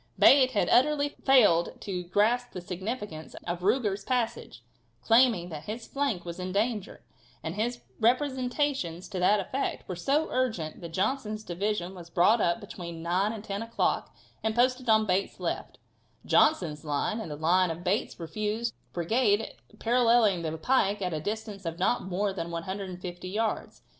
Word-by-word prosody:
Bate 265 -2 +7
had 205 - +2
utterly 290 +2 +4
failed 225 -13 +3
to 180 -3 -4
grasp 220 +7 +1
the 185 - -4
significance 185 -2 -5
of 175 0 -2
Ruger's 205 0 +1
passage, 230 - -2 0.4
claiming 225 - +4
that 155 -2 -7
his 225 +2 -5
flank 275 -11 -1
was 170 +1 -6
in 185 0 -4
danger, 210 0 -2 0.4
and 160 - -3
his 235 +4 -2 0.2
representations 250 - 0
to 190 -3 -4
that 205 +4 +4
effect 260 +8 -3
were 185 - -4
so 280 - +1
urgent 220 -12 -1
that 170 - -6
Johnson's 215 +4 -1
division 190 0 -2
was 175 -2 -11
brought 200 +6 +4
up 170 +5 +2
between 170 -5 -8
9 185 +5 +1
and 220 -2 -7
10 200 -1 -4
o'clock 230 0 -1 0.3
and 220 0 0
posted 255 0 +2
on 220 0 +5
Bate's 190 0 -1
left, - - -4 0.5
Johnson's 165 - +3
line 150 +9 -1
and 195 - -6
the 150 - -4
line 175 +4 +3
of 165 +2 -5
Bate's 190 +2 -1
refused 215 +7 -2 0.2
brigade 205 +4 +1 0.2
paralleling 230 -5 +3
the 160 -1 -3
pike 205 0 +1
at 180 -2 -1
a 155 - -1
distance 210 +1 -4
of 165 -1 -4
not 190 +7 +1
more 190 +2 -1
than 170 -3 -4
150 180 +1 -5
yards. 220 +3 -2
205 Hz, 160 wpm, -28 LUFS, 175-235 Hz, 0.5 s, Bate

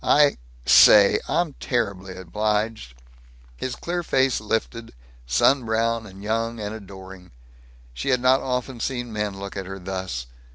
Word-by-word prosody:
I 145 -1 +4 0.3
Say 100 +8 +7
I'm 170 -4 0
terribly 100 -7 -2
obliged!" 105 - -2 0.6
His 125 - -4
clear 175 +1 -3
face 130 -7 +1
lifted, 110 - -3 0.3
sun 125 - +3
brown 115 0 -1
and 95 +1 -12
young 115 +2 -2
and 105 0 -4
adoring. 95 -3 -11 0.6
She - - -4
had 125 - +3
not 130 +2 +3
often 125 -1 -3
seen 120 -1 -3
men 105 -2 -3
look 100 0 -7
at 95 -2 -5
her 95 0 -6
thus. 95 -9 -5
110 Hz, 140 wpm, -23 LUFS, 95-120 Hz, 0.6 s, Say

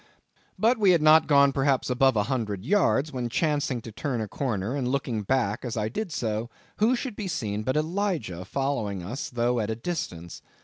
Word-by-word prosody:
But 230 +2 +3
we 200 -3 +4
had 170 - +3
not 155 0 +6
gone 140 -2 +5
perhaps 135 -1 +1
above 130 0 +3
a 105 - +2
hundred 110 -6 -3
yards, 155 -5 +2
when 125 -2 -2
chancing 145 -2 0
to 115 - -8
turn 125 +2 -3
a 110 - -3
corner, 115 -1 -2
and 135 -3 -1
looking 125 -4 -1
back 105 -1 0
as 120 -2 -4
I 105 0 -1
did 195 - -4
so, 110 -4 -2 0.3
who 225 +4 +3
should 250 -2 -4
be 205 -2 -4
seen 110 - -2
but 130 +6 -1
Elijah 160 - -1
following 110 -5 -2
us, 120 +10 -5
though 120 0 0
at 105 -1 -2
a 110 - -1
distance. 100 - -5
130 Hz, 195 wpm, -26 LUFS, 110-155 Hz, 0.3 s, not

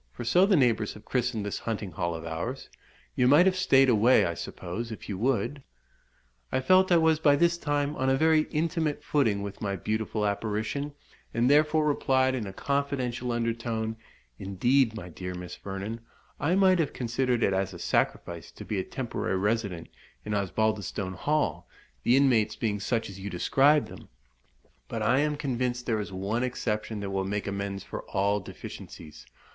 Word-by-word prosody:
for 60 - -7
so 180 +11 +4
the 200 - +4
neighbours 115 -7 +2
have 105 0 -13
christened 120 -4 -1
this 105 - -3
hunting 105 -4 -4
hall 85 +1 -2
of 80 0 -7
ours. 85 +12 -4 0.5
You 125 - +3
might 145 +7 +7
have 190 -1 +3
stayed 135 -8 +4
away, 120 +1 +5
I 85 - -1
suppose, 95 +7 -6
if 110 - -8
you 100 - -3
would?" 125 +3 0 0.9
I - - +1
felt 185 +7 +4
I 175 - +7
was 160 -1 +3
by 145 -3 +5
this 170 +3 +3
time 145 -3 -1
on 130 -1 0
a 135 - +3
very 160 +1 +3
intimate 155 -2 -1
footing 110 -11 +1
with 100 -1 -7
my 100 -2 -1
beautiful 110 +2 -2
apparition, 110 +8 -2 0.4
and 120 +1 +3
therefore 150 +1 +4
replied, 130 -3 +2
in 120 -6 -3
a - - -5
confidential 130 -1 -2
under 115 -1 0
tone 115 -1 -3 0.4
"Indeed, 115 +6 +2
my 100 -5 -7
dear 90 +1 -6
Miss 90 0 -7
Vernon, 100 +4 -5 0.4
I 165 +5 +1
might 190 -2 +4
have 155 - 0
considered 125 0 0
it 100 - +2
as 95 0 0
a 90 - -9
sacrifice 85 -1 -1
to - - -10
be 105 - -2
a - - -1
temporary 120 -6 -3
resident 100 -3 -1 0.4
in 105 - -3
Osbaldistone 100 -1 -1
Hall, 150 - -1 0.3
the 125 - +4
inmates 125 -6 +3
being 105 -3 -1
such 115 +3 -1
as 100 0 -10
you 100 +1 -5
describe 135 - +3
them; - - -12 0.8
but 115 -2 -3
I 125 +5 +3
am 150 0 0
convinced 125 -3 -2
there 110 -3 0
is 100 - -7
one 100 +5 -2
exception 110 -4 -2
that 100 -1 -4
will 95 0 0
make 100 +1 -2
amends 100 -1 -4
for - - -6
all 100 +1 +1
deficiencies." 75 -7 -10
115 Hz, 180 wpm, -28 LUFS, 100-140 Hz, 0.9 s, might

